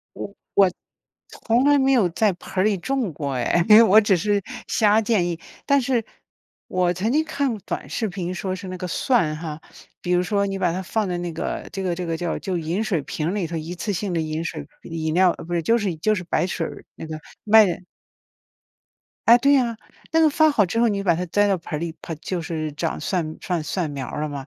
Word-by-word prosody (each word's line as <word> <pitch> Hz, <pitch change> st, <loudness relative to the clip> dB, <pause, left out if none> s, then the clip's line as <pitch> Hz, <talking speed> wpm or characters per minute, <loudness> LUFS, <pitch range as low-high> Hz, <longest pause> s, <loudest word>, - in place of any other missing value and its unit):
我 200 Hz, -, -7 dB, 0.2 s
我 195 Hz, -2 st, +5 dB, 0.7 s
从 240 Hz, +3 st, +2 dB
来 290 Hz, 0 st, +5 dB
没 270 Hz, 0 st, +3 dB
有 220 Hz, -9 st, +4 dB
在 210 Hz, +3 st, +2 dB
盆 180 Hz, -, -13 dB
儿 -, -, +1 dB
里 210 Hz, -2 st, +2 dB
种 250 Hz, -3 st, -2 dB
过 140 Hz, -2 st, -4 dB
哎， 170 Hz, +7 st, +1 dB
因 210 Hz, -, +9 dB
为 230 Hz, -, +9 dB
我 215 Hz, 0 st, +7 dB
只 205 Hz, -3 st, +3 dB
是 205 Hz, +3 st, 0 dB, 0.3 s
瞎 215 Hz, -1 st, +4 dB
建 210 Hz, -5 st, +1 dB
议。 170 Hz, -1 st, -3 dB, 0.3 s
但 280 Hz, 0 st, +4 dB
是， 240 Hz, -3 st, 0 dB, 0.6 s
我 180 Hz, -1 st, +1 dB
曾 210 Hz, +7 st, -1 dB
经 310 Hz, +2 st, +2 dB
看 280 Hz, -7 st, -1 dB
短 -, -, -4 dB
视 220 Hz, -3 st, -1 dB
频 180 Hz, -1 st, -4 dB
说 185 Hz, +1 st, -3 dB
是 190 Hz, 0 st, -7 dB
那 185 Hz, -, -5 dB
个 180 Hz, -, -5 dB
蒜 170 Hz, -5 st, +1 dB
哈， 155 Hz, -1 st, -6 dB, 0.4 s
比 180 Hz, -, -2 dB
如 180 Hz, -, +3 dB
说 200 Hz, +2 st, 0 dB
你 195 Hz, 0 st, -3 dB
把 180 Hz, -3 st, +1 dB
它 185 Hz, -, -3 dB
放 210 Hz, +1 st, -1 dB
在 175 Hz, -1 st, -2 dB
那 175 Hz, -1 st, -4 dB
个 160 Hz, -, -4 dB
这 195 Hz, -, -4 dB
个 180 Hz, -2 st, -1 dB
这 180 Hz, 0 st, -4 dB
个 165 Hz, -1 st, -1 dB
叫 170 Hz, -1 st, -2 dB
就 185 Hz, -2 st, -3 dB
饮 170 Hz, +6 st, -2 dB
水 175 Hz, -9 st, 0 dB
瓶 155 Hz, +2 st, -3 dB
儿 180 Hz, -, -1 dB
里 200 Hz, -5 st, -1 dB
头， 165 Hz, 0 st, -5 dB
一 160 Hz, +3 st, -5 dB
次 205 Hz, +4 st, -3 dB
性 190 Hz, 0 st, -3 dB
的 165 Hz, -, +1 dB
饮 155 Hz, +1 st, -3 dB
水 155 Hz, -3 st, -5 dB, 0.2 s
不 -, -, -11 dB
饮 160 Hz, -1 st, -2 dB
料， 185 Hz, 0 st, +5 dB
哦， -, -, -13 dB
不 -, -, -13 dB
对 170 Hz, -, +1 dB
就 230 Hz, +7 st, +3 dB
是 200 Hz, -6 st, -1 dB
就 215 Hz, +7 st, +1 dB
是 185 Hz, -, -3 dB
白 175 Hz, -, 0 dB
水 175 Hz, -2 st, -2 dB
儿 -, -, -10 dB
那 160 Hz, -, -8 dB
个， 155 Hz, 0 st, -6 dB, 0.3 s
卖 215 Hz, 0 st, +7 dB, 1.6 s
哎， 235 Hz, +1 st, +9 dB
对 280 Hz, +3 st, +4 dB
呀。 240 Hz, -4 st, +2 dB, 0.4 s
那 325 Hz, -, +4 dB
个 315 Hz, -, +6 dB
发 315 Hz, +2 st, +4 dB
好 220 Hz, -8 st, +3 dB
之 185 Hz, +6 st, -2 dB
后 235 Hz, -, +4 dB
你 205 Hz, -3 st, 0 dB
就 -, -, -2 dB
把 170 Hz, -3 st, +4 dB
它 180 Hz, -, -2 dB
栽 205 Hz, +4 st, +2 dB
到 195 Hz, -, +2 dB
盆 165 Hz, -2 st, -5 dB
儿 -, -, -3 dB
里， 170 Hz, -1 st, -3 dB
盆 165 Hz, -, -5 dB
就 180 Hz, 0 st, -3 dB
是 160 Hz, -2 st, -3 dB
长 160 Hz, +2 st, -3 dB
蒜 165 Hz, -5 st, -2 dB
蒜 175 Hz, -4 st, -2 dB
蒜 165 Hz, -2 st, -2 dB
苗 135 Hz, -2 st, -5 dB
儿 150 Hz, -, -5 dB
了 155 Hz, -, -1 dB
嘛。 140 Hz, -1 st, -6 dB
185 Hz, 265 characters per minute, -23 LUFS, 165-215 Hz, 1.6 s, 因